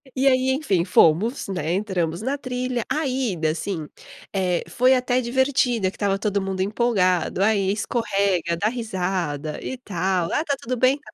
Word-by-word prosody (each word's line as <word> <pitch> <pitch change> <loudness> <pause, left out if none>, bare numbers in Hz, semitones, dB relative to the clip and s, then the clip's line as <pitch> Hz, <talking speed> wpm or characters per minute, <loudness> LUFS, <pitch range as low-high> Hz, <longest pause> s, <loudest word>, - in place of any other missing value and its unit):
E 270 +1 +2
aí, 260 0 +3
enfim, 205 - +1
fomos, 185 - +3
né, 175 -4 -2
entramos 185 -2 -1
na 270 +3 0
trilha, 250 -3 -3
a 310 -1 0
ida, 215 -12 0
assim, 160 -1 -4 0.5
eh, 180 -2 0
foi 255 +2 +3
até 250 0 +1
divertida 245 -5 +1
que - - -18
estava 200 -1 0
todo 200 -1 -1
mundo 190 -1 -3
empolgado, 195 -3 +1
aí 200 -3 +2
escorrega, 195 -6 0
dá 205 - +1
risada 180 - -3
e 260 - -4
tal 185 -5 -1
"Ah, 300 - +1
tá 280 -3 0
tudo 255 +2 -3
bem?" 260 +4 +3
205 Hz, 160 wpm, -23 LUFS, 180-250 Hz, 0.5 s, aí